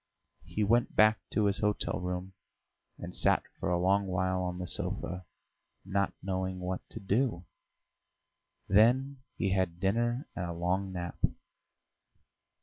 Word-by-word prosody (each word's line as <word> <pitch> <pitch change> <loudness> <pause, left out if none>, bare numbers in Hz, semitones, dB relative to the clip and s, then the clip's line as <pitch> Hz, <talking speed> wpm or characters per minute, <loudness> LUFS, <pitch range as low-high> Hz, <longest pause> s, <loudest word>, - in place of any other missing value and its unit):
He 105 - -1
went 120 +4 +2
back 110 -1 +6
to 105 - +1
his 100 0 +2
hotel 105 -2 0
room 90 +1 -4 0.6
and - - -7
sat - - +3 0.2
for - - -1
a 90 - +2
long 95 +3 +2
while 95 0 0
on 90 -1 -2
the 90 - -3
sofa, 90 +1 -4 0.6
not 100 +1 +1
knowing 95 -1 -2
what 90 0 -3
to - - -7
do, 100 -2 0 1.2
then 130 +6 +4
he 95 - 0
had 95 -3 0
dinner 120 - +1
and 90 - -2
a 85 - -3
long 90 +3 -1
nap. 90 -2 -6
95 Hz, 140 wpm, -31 LUFS, 90-105 Hz, 1.2 s, back